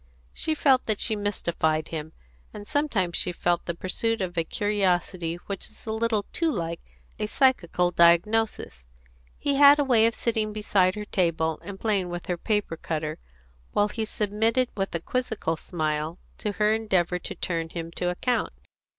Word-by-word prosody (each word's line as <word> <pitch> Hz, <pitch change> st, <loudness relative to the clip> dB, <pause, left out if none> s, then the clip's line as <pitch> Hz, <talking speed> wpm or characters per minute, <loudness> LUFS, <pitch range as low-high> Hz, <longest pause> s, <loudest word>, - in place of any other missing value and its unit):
She 315 Hz, -, 0 dB
felt 270 Hz, -4 st, +3 dB
that 215 Hz, -2 st, 0 dB
she 220 Hz, -, +1 dB
mystified 170 Hz, -6 st, -1 dB
him, 160 Hz, -1 st, -5 dB, 0.4 s
and 205 Hz, 0 st, -8 dB
sometimes 230 Hz, -, 0 dB
she 180 Hz, -, +2 dB
felt 175 Hz, 0 st, 0 dB
the 170 Hz, -, -2 dB
pursuit 225 Hz, +6 st, -1 dB
of 185 Hz, -2 st, -3 dB
a 165 Hz, -, +1 dB
curiosity 185 Hz, -3 st, 0 dB
which 200 Hz, -2 st, -4 dB
was 220 Hz, -, -18 dB
a 220 Hz, -, -3 dB
little 220 Hz, -2 st, 0 dB
too 330 Hz, -1 st, +1 dB
like 170 Hz, -, -3 dB, 0.4 s
a 210 Hz, -, -1 dB
psychical 180 Hz, -9 st, +2 dB
diagnosis. 170 Hz, -, +2 dB, 0.5 s
He 280 Hz, -1 st, 0 dB
had 285 Hz, 0 st, +8 dB
a 290 Hz, -, +3 dB
way 235 Hz, -5 st, +5 dB
of 230 Hz, -, -1 dB
sitting 220 Hz, -2 st, -1 dB
beside 195 Hz, -3 st, +2 dB
her 210 Hz, 0 st, -5 dB
table 165 Hz, -5 st, 0 dB
and 200 Hz, -1 st, -8 dB
playing 200 Hz, -5 st, 0 dB
with 175 Hz, 0 st, -5 dB
her 180 Hz, -2 st, -2 dB
paper 205 Hz, -6 st, -1 dB
cutter, 155 Hz, -1 st, -3 dB, 0.5 s
while 205 Hz, 0 st, +3 dB
he 220 Hz, +1 st, -3 dB
submitted 225 Hz, +4 st, 0 dB
with 195 Hz, -3 st, -2 dB
a -, -, +1 dB
quizzical 220 Hz, -8 st, -1 dB
smile 155 Hz, 0 st, -2 dB, 0.2 s
to 210 Hz, -, -2 dB
her 210 Hz, +1 st, +2 dB
endeavours 185 Hz, -5 st, +1 dB
to -, -, -5 dB
turn 165 Hz, -2 st, -2 dB
him 165 Hz, 0 st, -5 dB
to 180 Hz, +1 st, -2 dB
account. 240 Hz, +8 st, -1 dB
195 Hz, 170 wpm, -26 LUFS, 170-220 Hz, 0.5 s, had